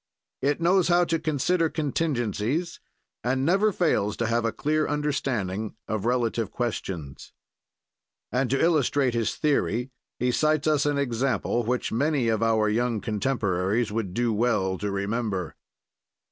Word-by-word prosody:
"It 145 +3 +1
knows 175 +1 +3
how 175 0 +4
to 165 -1 0
consider 165 +2 +1
contingencies, 145 - -1 0.4
and 130 +2 0
never 195 +6 +3
fails 155 - +1
to 115 - 0
have 115 +1 +1
a 115 - +1
clear 155 +4 0
understanding 125 -9 -2
of 110 -1 -2
relative 120 -3 0
questions." 90 - -5 1.0
And 125 +2 0
to 135 +2 +1
illustrate 145 -5 +2
his 115 -2 0
theory, 130 -4 0 0.3
he 125 0 +1
cites 155 +3 +1
us 150 -2 +2
an 145 -1 +1
example 125 -3 0
which 125 +2 -1
many 135 0 +1
of 110 -1 +1
our 110 -1 +3
young 115 +1 0
contemporaries 105 -2 0
would 105 -4 -3
do 120 -1 +1
well 105 -5 +1
to 105 - -2
remember. 100 -2 -2
120 Hz, 140 wpm, -26 LUFS, 110-150 Hz, 1.0 s, how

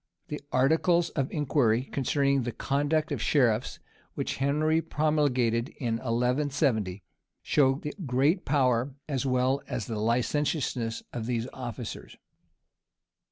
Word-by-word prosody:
The 150 - -4
articles 165 +6 +3
of 135 -1 -2
inquiry 130 -6 +2
concerning 140 0 +1
the 120 0 -3
conduct 145 +6 0
of - - -2
sheriffs, 120 -7 +2 0.4
which - - -3
Henry 155 +4 +2
promulgated 135 -7 +1
in 115 -4 -1
1170, 125 - 0 0.4
show 135 -2 +3
the 150 +1 -6
great 140 +7 +2
power 130 -2 +1
as 140 -2 -1
well 130 +2 +1
as 110 - -3
the 110 -2 -4
licentiousness 120 0 0
of 115 -2 -4
these 120 -1 -1
officers. 120 -3 -7
135 Hz, 115 wpm, -28 LUFS, 120-145 Hz, 0.4 s, articles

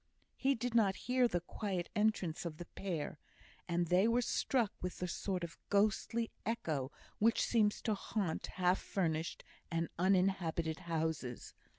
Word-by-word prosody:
He 275 +1 +2
did 245 +1 -2
not 205 -5 +4
hear 250 0 +4
the 175 -6 -1
quiet 185 0 -3
entrance 210 -6 +1
of 165 -3 -5
the 175 - -7
pair, 165 -6 -4 0.5
and 175 0 +1
they 180 +5 +4
were 240 +1 +3
struck 235 -3 +1
with 180 0 -3
the 180 - -2
sort 180 +1 -2
of 170 -2 -6
ghostly 215 +3 +2
echo 155 - -1 0.3
which 225 +2 +4
seems 215 -3 +2
to 220 - +2
haunt 195 -4 -2
half 180 0 +2
furnished 165 -4 -1 0.3
and 165 -1 -1
uninhabited 180 -4 +2
houses. 160 -6 -2
185 Hz, 150 wpm, -36 LUFS, 165-215 Hz, 0.5 s, not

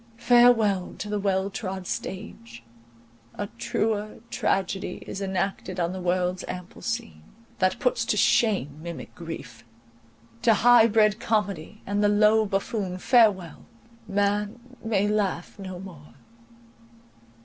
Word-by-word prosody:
—Farewell 235 -5 +4
to 210 - -6
the 210 0 -1
well 195 0 0
trod 190 -2 -5
stage; 115 -12 -6 0.7
a 205 - -3
truer 215 -1 -1
tragedy 195 0 -1
is 195 - -6
enacted 190 -1 -2
on 170 +1 0
the 190 - -5
world's 180 0 0
ample 180 -1 -8
scene, 85 - -4 0.4
that 185 -1 +2
puts - - +1
to - - 0
shame 170 - +2
mimic 170 0 -8
grief: 165 -9 -8 0.8
to 230 -2 +5
high 240 +1 +6
bred 215 -1 +3
comedy, 205 -3 -2
and 205 +1 0
the 205 - +4
low 215 +1 +4
buffoon, 195 -1 -2
farewell!—Man 210 - 0 0.2
may 205 -3 +1
laugh 205 -3 -1
no 185 -2 -7
more. 170 -6 -12
200 Hz, 120 wpm, -26 LUFS, 185-215 Hz, 0.8 s, high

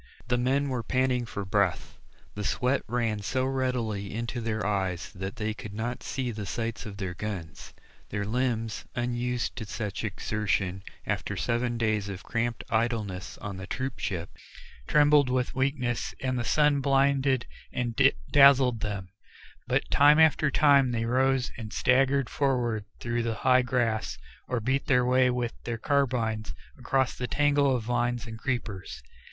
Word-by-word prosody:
The 125 - +2
men 135 +3 +1
were 125 -2 -1
panting 125 +1 0
for 100 -2 -5
breath; 95 -2 0 0.3
the 105 - -5
sweat 125 +6 +1
ran 115 -3 -1
so 130 +6 -1
readily 125 -7 -2
into 120 +1 -3
their 110 -1 -2
eyes 95 -4 -1
that 95 +1 -5
they 110 0 -2
could 105 -1 -9
not 120 +3 -3
see 130 -2 -3
the 105 -3 -6
sights 115 +1 -3
of 100 -2 -8
their 95 -3 -3
guns; 90 -5 -6 0.3
their 100 -1 -2
limbs 115 -1 -1
unused 120 0 -1
to 110 - -4
such 105 -1 -4
exertion 100 -2 -1 0.2
after - - -2
seven 120 0 0
days 110 -3 0
of 95 -2 -7
cramped 115 0 -2
idleness 110 -5 -1
on 100 -2 -6
the 95 0 -7
troop 130 +5 -4
ship, 85 -2 -3 0.6
trembled 145 -2 +5
with 125 0 0
weakness 130 -3 -1
and 130 -1 -1
the - - -1
sun 150 +3 +3
blinded 135 -2 +2 0.3
and 120 -2 -2 0.4
dazzled 135 -4 +6
them; 100 -3 -4 0.6
but - - +1
time 145 +1 +6
after 155 -1 +5
time 140 -2 +5
they 115 -1 -1
rose 130 +2 +2
and 110 -2 -7
staggered 135 +2 +3
forward 120 -6 0
through 120 0 -1
the 115 -1 -1
high 130 0 +6
grass, 120 -3 -1 0.3
or 125 - -1
beat 130 +6 -1
their 125 -4 +4
way 125 0 +4
with 125 -1 -1
their 120 -1 -3
carbines 115 - 0 0.2
against 130 -2 0
the 125 - -2
tangle 145 -1 +3
of 120 - -2
vines 120 0 -1
and 110 -1 -8
creepers. 115 -7 -4
120 Hz, 160 wpm, -28 LUFS, 110-130 Hz, 0.6 s, dazzled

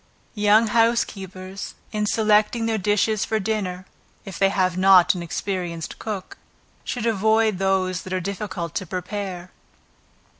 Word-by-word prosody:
Young 210 +1 +4
housekeepers 195 -4 -1 0.2
in 210 -1 -1
selecting 215 +1 +2
their 225 -1 0
dishes 210 +1 +1
for 220 - -1
dinner, 190 -3 -3 0.4
(if 195 -4 -8
they 195 - +4
have 185 -2 +1
not 185 -1 +6
an 180 - -5
experienced 170 -1 -4
cook,) 205 -4 -6 0.4
should 245 -3 -3
avoid 220 -2 +2
those 190 -1 +1
that 185 - -10
are 185 - 0
difficult 190 -3 -4
to 190 - -3
prepare. 185 0 -5
195 Hz, 135 wpm, -23 LUFS, 185-215 Hz, 0.4 s, not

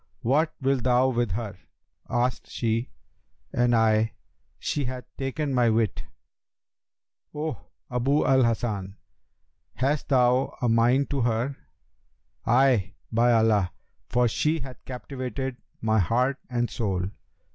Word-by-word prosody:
'What 155 +6 +2
wilt 135 -2 +1
thou 125 +1 +4
with 120 -6 0
her?' 105 -3 -4 0.5
asked 125 +1 -1
she; 115 +1 -1 0.6
and 120 0 +3
I, 110 -1 +3 0.4
'She 145 -2 -2
hath 125 0 -5
taken 140 +1 -2
my 120 -2 +4
wit.' 110 -4 0 1.3
'O 150 -8 -4 0.3
Abu 135 +4 +2
al 130 -1 +5
Hasan, 110 -4 -1 0.8
hast 140 +3 0
thou 125 -1 +3
a 125 - 0
mind 120 +5 +3
to 140 -2 0
her?' 120 +4 0 0.9
'Ay, 120 -5 +3 0.2
by 120 +2 +4
Allah! 110 -5 +3 0.4
for 125 0 +3
she 155 +7 0
hath 130 -3 -9
captivated 130 0 -5 0.2
my 110 0 +2
heart 125 +8 +1
and 120 -1 -1
soul.' 95 -5 -1
120 Hz, 120 wpm, -26 LUFS, 115-130 Hz, 1.3 s, al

